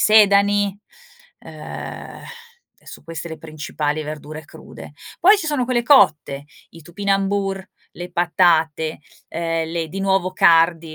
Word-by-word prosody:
sedani, 205 Hz, -1 st, +4 dB, 0.6 s
ehm, -, -, -9 dB, 0.6 s
e -, -, -27 dB
son -, -, -12 dB
queste 165 Hz, 0 st, -7 dB
le 160 Hz, -, -8 dB
principali 155 Hz, -1 st, -4 dB
verdure 155 Hz, +1 st, -8 dB
crude. -, -, -13 dB, 0.3 s
Poi 405 Hz, +4 st, +6 dB
ci 330 Hz, -, -4 dB
sono 295 Hz, -5 st, 0 dB
quelle 240 Hz, -1 st, 0 dB
cotte, 150 Hz, -, +3 dB, 0.2 s
i 165 Hz, -, -14 dB
topinambur, 195 Hz, +2 st, -1 dB, 0.3 s
le 175 Hz, 0 st, -8 dB
patate, 165 Hz, -3 st, +1 dB, 0.3 s
ehm 165 Hz, -1 st, -2 dB
le 165 Hz, -1 st, -2 dB
di 195 Hz, +5 st, -6 dB
nuovo 190 Hz, -1 st, +1 dB
cardi 165 Hz, -2 st, +3 dB
175 Hz, 125 wpm, -20 LUFS, 160-200 Hz, 0.6 s, Poi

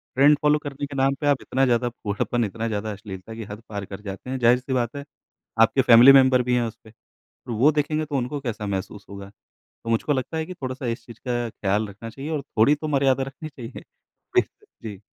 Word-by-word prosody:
Trend 145 Hz, +2 st, +6 dB
follow 150 Hz, 0 st, +3 dB
करने 145 Hz, -1 st, -5 dB
के 140 Hz, -, -9 dB
नाम 135 Hz, +1 st, +2 dB
पे 145 Hz, -, 0 dB
आप 140 Hz, -2 st, +2 dB
इतना 135 Hz, +1 st, +1 dB
ज़्यादा 120 Hz, -1 st, +1 dB
फूहड़पन, 115 Hz, +1 st, -2 dB
इतना 115 Hz, +3 st, -4 dB
ज़्यादा 110 Hz, 0 st, -3 dB
अश्लीलता 100 Hz, 0 st, -9 dB
की 115 Hz, -, -6 dB
हद 105 Hz, +2 st, -8 dB
पार 100 Hz, -2 st, -5 dB
कर 95 Hz, +1 st, -9 dB
जाते 100 Hz, +4 st, -8 dB
हैं। 130 Hz, -, -2 dB
ज़ाहिर-सी 125 Hz, +2 st, +3 dB
बात 120 Hz, -1 st, -1 dB
है, 140 Hz, 0 st, -6 dB, 0.6 s
आपके 130 Hz, +4 st, +5 dB
फैमिली 120 Hz, +2 st, +8 dB
मेंबर 130 Hz, -2 st, +6 dB
भी 125 Hz, 0 st, +1 dB
हैं 120 Hz, -, +2 dB
उस 115 Hz, 0 st, -9 dB
पे, 110 Hz, -, -15 dB
और 115 Hz, +1 st, -13 dB
वो 140 Hz, +8 st, +5 dB
देखेंगे 155 Hz, +1 st, -1 dB
तो 145 Hz, -, -5 dB
उनको 130 Hz, +3 st, -2 dB
कैसा 115 Hz, -5 st, -4 dB
महसूस 100 Hz, +1 st, -4 dB
होगा। 100 Hz, 0 st, -9 dB, 0.5 s
तो 115 Hz, -, -6 dB
मुझको 115 Hz, +6 st, +1 dB
लगता 135 Hz, +4 st, -3 dB
है 160 Hz, -, -2 dB
कि 185 Hz, -, -7 dB
थोड़ा-सा 130 Hz, -2 st, -5 dB
इस 115 Hz, 0 st, -4 dB
चीज़ 115 Hz, -1 st, -13 dB
का 120 Hz, -1 st, -1 dB
ख्याल 105 Hz, +1 st, -1 dB
रखना 105 Hz, +3 st, -9 dB
चाहिए 140 Hz, +7 st, -7 dB
और 150 Hz, -, -1 dB
थोड़ी 135 Hz, +1 st, +3 dB
तो 155 Hz, +1 st, -5 dB
मर्यादा 135 Hz, -2 st, +2 dB
रखनी 135 Hz, +4 st, -8 dB
चाहिए। 125 Hz, -3 st, -9 dB, 0.5 s
बिल्कुल। -, -, 0 dB, 0.2 s
जी। 100 Hz, -, -11 dB
125 Hz, 225 wpm, -24 LUFS, 110-140 Hz, 0.6 s, फैमिली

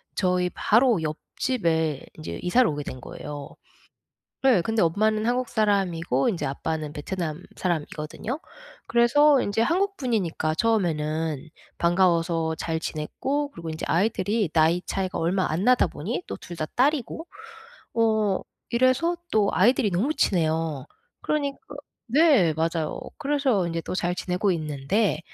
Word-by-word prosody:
저희 180 Hz, -1 st, +1 dB
바로 230 Hz, -3 st, +3 dB
옆집에 160 Hz, -, -1 dB
인제 155 Hz, -, -6 dB
이사를 235 Hz, +8 st, +4 dB
오게 145 Hz, -1 st, -3 dB
된 130 Hz, -2 st, -7 dB
거예요. 145 Hz, +3 st, -8 dB, 0.9 s
네. 260 Hz, -8 st, +5 dB
근데 225 Hz, +3 st, +1 dB
엄마는 215 Hz, +6 st, +2 dB
한국 245 Hz, +1 st, 0 dB
사람이고 190 Hz, -, +1 dB
인제 170 Hz, -9 st, -1 dB
아빠는 155 Hz, +2 st, -3 dB
베트남 160 Hz, +1 st, -4 dB
사람이거든요. 170 Hz, -, -3 dB, 0.5 s
그래서 265 Hz, +5 st, +5 dB
인제 205 Hz, +1 st, 0 dB
한국 390 Hz, +9 st, +1 dB
분이니까 190 Hz, -, -1 dB
처음에는 160 Hz, -8 st, 0 dB, 0.3 s
반가워서 170 Hz, -2 st, +2 dB
잘 160 Hz, 0 st, -2 dB
지냈고 270 Hz, -, -2 dB
그리고 165 Hz, -7 st, -7 dB
인제 155 Hz, -, -5 dB
아이들이 200 Hz, +1 st, +1 dB
나이 165 Hz, +2 st, +3 dB
차이가 190 Hz, -1 st, -2 dB
얼마 185 Hz, +3 st, +1 dB
안 165 Hz, +5 st, -1 dB
나다 250 Hz, +1 st, +5 dB
보니 190 Hz, -, -4 dB
또 -, -, -5 dB
2 175 Hz, -, -10 dB
다 155 Hz, -, -2 dB
딸이고 290 Hz, +4 st, +1 dB, 0.7 s
어 220 Hz, -4 st, +2 dB, 0.3 s
이래서 255 Hz, +8 st, +2 dB, 0.2 s
또 210 Hz, -2 st, +3 dB
아이들이 215 Hz, +2 st, +3 dB
너무 220 Hz, -, +1 dB
친해요. 160 Hz, -, 0 dB, 0.4 s
그러니까 285 Hz, -2 st, -1 dB, 0.5 s
네 270 Hz, -, +5 dB
맞아요. 160 Hz, 0 st, -1 dB, 0.2 s
그래서 275 Hz, -, +1 dB
인제 165 Hz, 0 st, -2 dB
또 -, -, -5 dB
잘 175 Hz, -1 st, -1 dB
지내고 185 Hz, +2 st, 0 dB
있는데 155 Hz, +5 st, 0 dB
185 Hz, 305 characters per minute, -25 LUFS, 160-235 Hz, 0.9 s, 네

